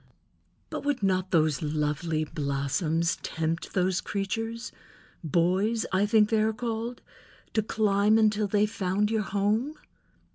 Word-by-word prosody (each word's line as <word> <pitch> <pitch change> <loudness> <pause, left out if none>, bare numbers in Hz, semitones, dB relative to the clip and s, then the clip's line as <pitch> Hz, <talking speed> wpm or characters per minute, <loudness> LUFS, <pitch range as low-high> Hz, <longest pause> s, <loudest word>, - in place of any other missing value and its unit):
"But - - -4
would 285 -6 -1
not 185 -1 +1
those 155 -4 +2
lovely 155 +1 -1
blossoms 150 +3 -1
tempt 165 +1 -3
those 185 -1 +1
creatures—boys, 200 - -2
I 195 +2 +3
think 215 0 +4
they 220 -1 +2
are 220 +1 +1
called—to 230 -1 -5
climb 210 0 +2
until 215 -1 +3
they 205 +1 +3
found 210 -1 -1
your 220 -1 +1
home?" 210 +8 0
200 Hz, 115 wpm, -27 LUFS, 165-220 Hz, -, think